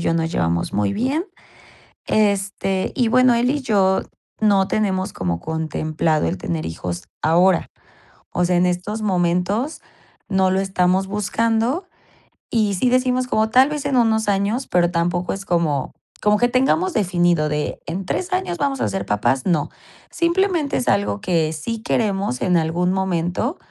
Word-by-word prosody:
yo 165 - 0
nos 165 0 -1
llevamos 85 0 0
muy 105 -1 0
bien. 275 - -1 0.8
Este, 200 -2 0
y 245 -4 +1
bueno, 255 +1 +4
él 240 +2 +2
y 290 +1 -1
yo 195 -6 +2 0.4
no 200 -3 +3
tenemos 190 -2 -1
como 85 -2 -2
contemplado 155 - -1
el 95 - -3
tener 80 -2 -3
hijos 85 +2 -5 0.2
ahora. 175 +3 +3 0.6
O 180 - 0
sea, 180 0 +2
en 175 +1 +3
estos 180 +5 -2
momentos 190 - 0 0.5
no 190 -1 +2
lo 190 +1 +1
estamos 190 0 +1
buscando, 225 - 0 0.6
y 215 -3 +1
sí 245 +7 +1
decimos 255 0 +1
como 220 -2 +1
tal 260 +4 +5
vez 300 -2 -4
en 280 -2 0
unos 220 -2 +2
años, 205 +6 0
pero 175 -1 +2
tampoco 175 +1 -1
es 195 - -6
como 160 -6 0 0.3
como 210 0 +4
que 245 - +3
tengamos 270 +9 +1
definido 175 -6 +1
de 150 0 -2
en 185 +3 -4
3 360 - -3
años 370 - -1
vamos 275 -1 -1
a - - +1
ser 195 - -3
papás, 120 +6 +1
no. 165 -6 +1 0.4
Simplemente 340 -3 +1
es 250 - -3
algo 200 +1 +1
que 165 -6 +1
sí 220 +9 -4
queremos 200 - -1
en 180 -1 +2
algún 170 +3 0
momento, 190 - -1
195 Hz, 160 wpm, -21 LUFS, 170-230 Hz, 0.8 s, tal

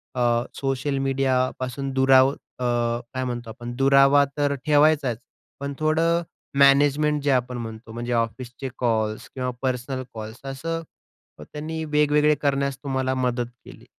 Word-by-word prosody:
अ, 120 -1 +2 0.2
social 135 +1 -1
मीडियापासून 135 0 -1
दुराव 130 0 +5
अ, - - -8 0.8
काय 130 0 -2
म्हणतो 120 -2 -4
आपण 120 +2 -7
दुरावा 135 +2 +5
तर 145 -1 +1
ठेवायचाच 145 -5 +3 0.4
पण 140 0 -4
थोडं 165 +2 +2 0.4
मॅनेजमेंट 145 +2 +4
जे 145 - +2
आपण 125 -1 0
म्हणतो. 110 -1 -7
म्हणजे 120 +1 -4
ऑफिसचे 120 +3 -3
कॉल्स 110 -3 -1
किंवा 125 -1 -2
पर्सनल 130 0 -2
कॉल्स 110 +2 -8
असं 165 +5 -4 0.6
त्यांनी 155 - -5
वेगवेगळे 150 0 +3
करण्यास 140 -1 0
तुम्हाला 130 -1 -1
मदत 125 -1 0 0.2
केली. - - -13
135 Hz, 130 wpm, -24 LUFS, 125-145 Hz, 0.8 s, दुराव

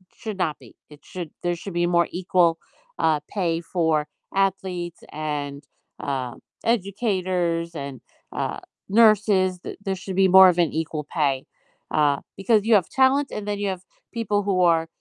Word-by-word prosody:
should 215 -3 -6
not 160 -5 -1
be. - - -17
It 150 -1 -15
should 175 -4 -7
there 175 0 0
should 190 +2 -8
be 175 0 +1
more 170 0 +3
equal, 175 -2 +2 0.4
uh, 155 -2 +2
pay 170 -5 -1
for 160 -3 0 0.3
athletes 185 -3 -1
and, 145 -2 -4 0.4
uh, 130 -3 -3 0.3
educators 185 -6 0
and, 140 -4 -6 0.3
uh, - - -3 0.3
nurses, 205 -4 +4
th - - -7
there 195 -2 -1
should 190 0 -6
be 190 0 +4
more 190 +1 +9
of 180 - 0
an 170 -3 +2
equal 155 -1 -3
pay, 140 -5 0 0.5
uh, 145 -2 +2 0.2
because 210 +1 +3
you 230 - +5
have 185 -5 +3
talent 270 +1 +3
and 210 - -5
then 205 -1 -2
you 205 - -1
have 185 -1 -4 0.3
people 210 -3 0
who 190 -2 +1
are 165 -2 +3
180 Hz, 165 wpm, -24 LUFS, 160-195 Hz, 0.5 s, more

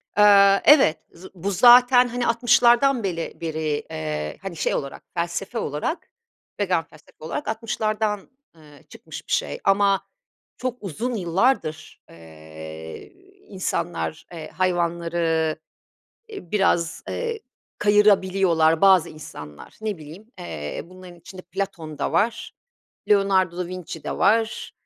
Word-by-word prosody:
Aaa, 200 -1 +6
evet 280 - +6
z 175 +3 -15
bu 190 +3 -3
zaten, 245 +4 +7
hani 245 0 -2
60'lardan 240 +2 +4
beli 170 -4 -4
beri, 155 -2 -2
eee, 75 -1 -4
hani, 195 -3 -6
şey, - - -1
olarak 140 -1 -5
felsefe 170 +6 -3
olarak, 150 - -4 0.5
vegan 185 -5 +1
felsefe 155 0 -21
olarak 160 - -5
60'lardan, 215 -2 -2 0.3
ııı, 150 -3 -18
çıkmış - - -11
bir - - -10
şey. 70 - -1
Ama 195 0 +3 0.6
çok 250 -1 -3
uzun 220 - -3
yıllardır, 170 -4 -1
eee, 80 - -11 0.3
insanlar, 175 -4 -3
eee, 165 -2 -8
hayvanları, 170 -3 0 0.8
ııı, 180 - -9
biraz, 175 -5 +1
eee, 465 -2 -3 0.4
kayırabiliyorlar 190 -6 +3
bazı 190 -4 +5
insanlar. 75 - -11
Ne 215 -4 -3
bileyim, 170 +10 -13
eee, 75 -4 -6
bunların 185 0 -13
içinde 185 +2 -11
Platon 175 -5 -6
da 140 - -2
var, 225 +7 0 0.5
Leonardo 195 -4 +3
da 180 - -2
Vinci 175 -3 -8
de - - -4
var, 225 +2 +1
185 Hz, 120 wpm, -23 LUFS, 160-210 Hz, 0.8 s, zaten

